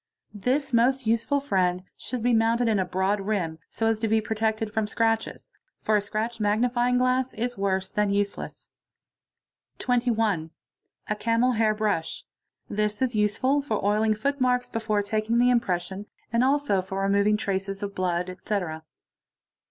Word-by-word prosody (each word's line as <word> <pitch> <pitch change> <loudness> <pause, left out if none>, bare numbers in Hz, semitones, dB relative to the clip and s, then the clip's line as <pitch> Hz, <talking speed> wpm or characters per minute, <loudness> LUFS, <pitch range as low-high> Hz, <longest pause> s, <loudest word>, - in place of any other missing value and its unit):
This 255 +7 -1
most 255 +2 +3
useful 230 +6 +1
friend 185 -9 0
should 250 -2 -5
be 245 0 +3
/mounted 230 +1 +3
in 215 -3 +2
a 190 - +1
broad 190 +3 0
rim, 185 -6 -2
so 225 - -2
as 225 -1 +2
to 225 - 0
be 220 +1 +3
protected 220 0 -1
from 220 -1 0
scratches, 225 0 -1 0.3
for 215 - +2
a 210 - +3
cratched 220 +3 -3
magnifying 240 +4 +2
glass 255 +1 +1
is 245 +2 -2
worse 190 -2 -1
than 210 -1 +1
useless. 200 0 -3 0.5
— - - -59
21. 225 -9 +1 0.6
A 210 - 0
camel 230 +3 +2
hair 220 -2 +2
brush. 215 - -2 0.4
This 210 0 -1
is 260 -2 0
useful 215 +7 +2
for 220 -8 -2
oiling 215 +1 +2
footmarks 250 +1 0
before 215 -2 -1
'taking 215 +3 0
the 245 +1 +5
impression 195 -3 -1 0.3
and 235 +1 +3
also 270 -7 +2
for 190 +1 -4
removing 200 +2 +3
traces 195 0 -3
of 200 0 -4
blood, 180 -1 -1
etc. 185 0 -3
22. 160 - -29
215 Hz, 160 wpm, -26 LUFS, 200-240 Hz, 0.6 s, the